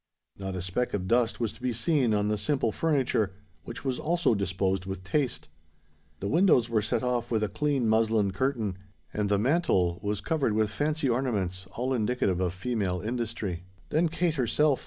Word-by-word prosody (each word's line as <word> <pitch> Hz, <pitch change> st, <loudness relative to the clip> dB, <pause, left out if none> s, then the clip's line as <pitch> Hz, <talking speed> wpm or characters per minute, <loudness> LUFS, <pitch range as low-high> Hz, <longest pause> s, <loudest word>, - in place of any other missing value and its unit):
Not 95 Hz, -1 st, -5 dB
a 90 Hz, -, -3 dB
speck 100 Hz, +7 st, -1 dB
of 95 Hz, -2 st, -3 dB
dust 120 Hz, +1 st, +2 dB
was 115 Hz, -3 st, -1 dB
to 115 Hz, -, -18 dB
be 125 Hz, 0 st, 0 dB
seen 125 Hz, +1 st, +2 dB
on 105 Hz, -1 st, +2 dB
the 105 Hz, -, +1 dB
simple 130 Hz, 0 st, 0 dB
furniture, 130 Hz, -8 st, +1 dB, 0.3 s
which 120 Hz, +4 st, -8 dB
was 130 Hz, -2 st, -1 dB
also 170 Hz, -4 st, +2 dB
disposed 95 Hz, -1 st, -1 dB
with 95 Hz, -1 st, -5 dB
taste: 130 Hz, +6 st, -1 dB, 0.7 s
the 100 Hz, -, -2 dB
windows 155 Hz, -, +4 dB
were 110 Hz, -2 st, +2 dB
set 115 Hz, +2 st, -1 dB
off 120 Hz, -1 st, 0 dB
with 110 Hz, -2 st, +1 dB
a -, -, +2 dB
clean 135 Hz, +4 st, 0 dB
muslin 110 Hz, -2 st, +3 dB
curtain; 110 Hz, -4 st, -1 dB, 0.3 s
and 105 Hz, -1 st, 0 dB
the 100 Hz, -, +3 dB
mantel 100 Hz, -, +2 dB
was 105 Hz, 0 st, -1 dB
covered 135 Hz, +1 st, 0 dB
with 110 Hz, -1 st, +1 dB
fancy 150 Hz, +6 st, 0 dB
ornaments 105 Hz, -8 st, -1 dB
all 130 Hz, +2 st, -1 dB
indicative 110 Hz, -6 st, +1 dB
of 90 Hz, -2 st, +1 dB
female 95 Hz, -3 st, -1 dB
industry. 105 Hz, -5 st, -3 dB, 0.2 s
Then 160 Hz, +2 st, +2 dB
Kate 170 Hz, 0 st, 0 dB
herself! 140 Hz, +4 st, +2 dB
115 Hz, 180 wpm, -28 LUFS, 100-130 Hz, 0.7 s, windows